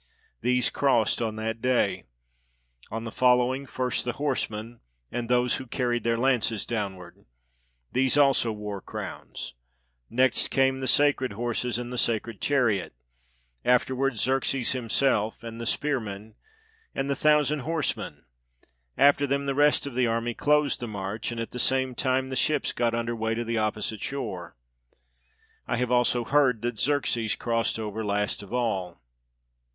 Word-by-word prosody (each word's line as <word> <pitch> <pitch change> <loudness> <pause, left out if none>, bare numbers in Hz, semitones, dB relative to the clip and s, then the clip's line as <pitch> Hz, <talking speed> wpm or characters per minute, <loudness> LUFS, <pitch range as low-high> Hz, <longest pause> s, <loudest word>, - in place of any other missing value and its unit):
These 125 +1 +2
crossed 130 -5 +2
on 110 -2 -1
that 110 +1 -3
day. 100 -8 +1 0.8
On 115 +1 -4
the 115 - -5
following, 125 +2 +2
first 125 -1 -1
the 120 - -2
horse 140 -2 -1
men, 110 +2 -8 0.3
and 120 -1 -3
those 125 0 +2
who 130 - -8
carried 120 -2 -1
their 115 0 +1
lances 120 -4 +1
downward: 95 -6 -5 0.7
these 130 +2 +2
also 135 -5 +4
wore 105 -2 -5
crowns; - - -7 0.6
next 130 +3 +2
came 135 0 +2
the 130 - -3
sacred 130 -2 +3
horses 120 +1 -1
and 120 0 -5
the 125 - -1
sacred 115 -1 -1
chariot; 120 - +1 0.7
afterward 130 +1 +2
Xerxes 130 +1 +1
himself, 120 -3 0
and 115 0 -7
the 115 - -3
spear 145 +1 +1
men, 105 0 -8 0.6
and 135 - -1
the 140 - 0
thousand 150 +1 +3
horsemen; 160 +2 -3 0.7
after 145 0 +5
them 140 +1 0
the 140 - 0
rest 145 +1 +3
of 140 - -5
the 125 0 +2
army 115 +1 -1
closed 150 +2 +2
the 120 - -4
march, 100 0 -4
and 120 - -5
at 115 - -4
the 125 - -5
same 130 0 +1
time 130 +1 0
the 130 - -3
ships 150 +2 +1
got 120 -1 0
under 115 0 -2
weigh 110 0 -1
to 120 - -2
the 115 0 0
opposite 110 0 -2
shore. 95 -11 -5 1.1
I - - 0
have 125 0 -1
also 125 0 +3
heard 130 -4 +2
that 120 -3 -2
Xerxes 120 -5 +1
crossed 115 -1 0
over 110 0 -4
last 105 0 -1
of 100 - -12
all. 100 - -1
120 Hz, 155 wpm, -27 LUFS, 110-130 Hz, 1.1 s, after